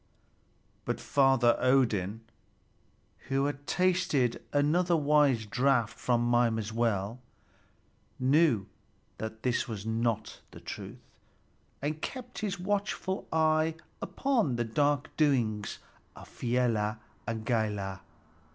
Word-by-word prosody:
But - - -2
Father 135 -4 +4
Odin, 115 -6 +2 1.1
who 135 +1 +2
had 145 0 -4
tasted 175 -9 +1
another 165 +5 +2
wise 145 -6 +3
draught 125 0 +1
from 120 -1 +1
Mimer's 115 -3 +1
well, 115 -1 0 1.0
knew 130 - +3 0.5
that 110 0 -6
this 125 -1 0
was 110 -3 -6
not 115 -1 -1
the - - -12
truth, - - -8 0.8
and 155 +2 -2
kept 250 -1 -6
his 200 -3 -3
watchful 195 0 -2
eye 160 0 +2 0.3
upon 235 - 0
the 120 - 0
dark 145 +4 0
doings 120 -9 +1 0.4
of - - -12
Fialar 115 -3 0 0.3
and 110 -1 -3
Galar. 105 -5 -1
125 Hz, 105 wpm, -30 LUFS, 110-150 Hz, 1.1 s, Father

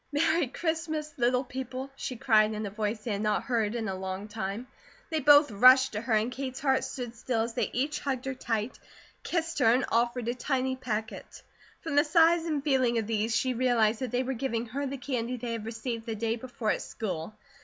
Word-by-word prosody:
"Merry 315 +1 +2
Christmas, 315 0 -3
little 250 +1 +2
people," 260 +1 -6
she 255 - -5
cried 220 -3 +3
in 215 0 -3
a 200 - -5
voice 210 +1 -3
they 235 - -3
had 200 0 -1
not 210 -1 +1
heard 230 -3 0
in 225 -2 -2
a 190 - -2
long 190 +2 -5
time. 210 +2 -4 0.5
They 315 - +1
both 290 0 +6
rushed 255 +5 +7
to 210 - -3
her 235 0 -1
and 220 +3 +2
Kate's 260 0 -5
heart 265 -2 +2
stood 245 -2 -5
still 235 -1 -1
as 230 0 -4
they - - -1
each 280 +5 -1
hugged 265 -3 -3
her 265 - -2
tight, 230 -2 -3 0.4
kissed 335 -2 -2
her, 225 -4 +5
and 255 +3 +2
offered 235 0 +1
a 240 - +1
tiny 260 0 -1
packet. 220 -4 -5 0.4
From 320 - -4
the 290 - +6
size 330 +2 +4
and 300 -4 -1
feeling 260 -5 +2
of 225 - 0
these, 225 +1 0
she 260 -1 +1
realized 230 -3 +2
that 255 -2 -3
they 245 +3 0
were 265 +1 -2
giving 235 -2 -2
her 280 +4 -3
the 275 +1 -4
candy 250 -2 -3
they 235 0 -4
had 225 -1 -4
received 230 0 -4
the 225 - -2
day 225 +1 -1
before 240 -2 -3
at - - -1
school. 185 -2 -5
245 Hz, 220 wpm, -29 LUFS, 225-265 Hz, 0.5 s, rushed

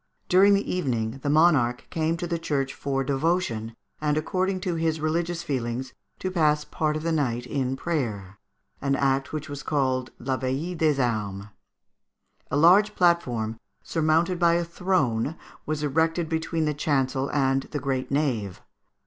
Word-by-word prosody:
During 195 +2 +6
the 200 - 0
evening 125 -8 -1
the 145 - -1
monarch 145 -6 +3
came 160 +1 0
to 175 - -3
the 170 -1 -2
church 135 -4 -1
for 135 -1 -2
devotion, 135 -6 -1 0.3
and 150 0 +1
"according 185 +3 0
to 185 -2 -1
his 160 -1 0
religions 170 +2 -1
feelings, 130 -4 -3 0.2
to 185 - -3
pass 150 -4 +2
part 155 -1 -1
of 155 - -6
the 165 - 0
night 125 -6 0
in 130 0 -1
prayer," 110 - -3 0.4
an 140 0 +1
act 135 0 +1
which 155 0 -4
was 145 -1 -6
called 130 -4 0
la 130 +1 -2
veillée 135 +8 -2
des 155 -4 +2
armes. 105 -5 -1 1.0
A 140 - 0
large 195 +7 +5
platform, 120 -11 +1 0.2
surmounted 165 +2 +1
by 170 -1 +4
a 170 0 0
throne, 165 -7 0 0.3
was 155 -1 -2
erected 160 +3 +1
between 160 0 -1
the 150 - 0
chancel 135 -2 0
and 135 -1 +1
the 150 - -3
great 130 -1 -2
nave. 125 -10 -1
150 Hz, 155 wpm, -26 LUFS, 130-165 Hz, 1.0 s, During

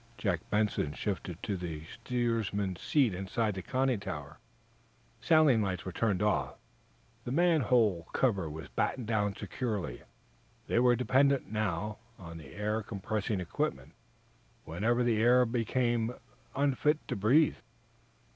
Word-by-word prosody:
Jack 95 -6 0
Benson 105 -8 0
shifted 90 -4 -4
to 100 - -1
the 85 -4 -5
steersman's 110 -4 -2
seat 135 -9 +2
inside 100 +4 -1
the 95 - -5
conning 130 +4 0
tower. 75 -6 -7 0.8
Sailing 150 -4 +4
lights 95 -3 -2
were 95 - -4
turned 105 0 0
off; 105 0 0 0.7
the 120 - -5
manhole 125 - +3
cover 100 -11 +1
was 80 +1 -7
battened 125 - -1
down 105 -3 0
securely. 105 - -4 0.6
They - - +1
were 125 0 +5
dependent, 135 +2 +2
now, 105 -1 -2 0.2
on 85 -2 -9
the 70 0 -12
air 105 +2 -1
compressing 105 -1 -3
equipment 65 -7 -3 0.7
whenever 115 +9 +1
the 120 -2 +2
air 125 +2 +6
aboard 115 -1 -3
became 120 -2 0 0.4
unfit 145 +2 +1
to - - -2
breathe. 130 +10 +3
110 Hz, 130 wpm, -31 LUFS, 95-125 Hz, 0.8 s, air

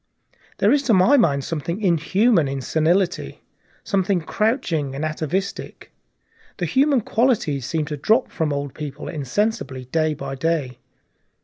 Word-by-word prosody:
There - - +3
is, 290 - +4
to 220 - +6
my 190 +10 +5
mind, 145 - +3
something 165 +5 -3
inhuman 190 - +2
in 135 0 -3
senility, 170 +6 0 0.4
something 195 -2 +1
crouching 165 - -1
and 145 +3 -2
atavistic; 155 +5 -4 0.7
the - - -2
human 275 -1 +2
qualities 210 - 0
seem 160 -2 -1
to 150 -1 -5
drop 220 - +2
from 160 -3 -1
old 140 -1 -3
people 150 -1 -7
insensibly 155 - -2
day 155 +3 0
by 135 -1 -6
day. 135 -4 -2
165 Hz, 135 wpm, -22 LUFS, 145-210 Hz, 0.7 s, to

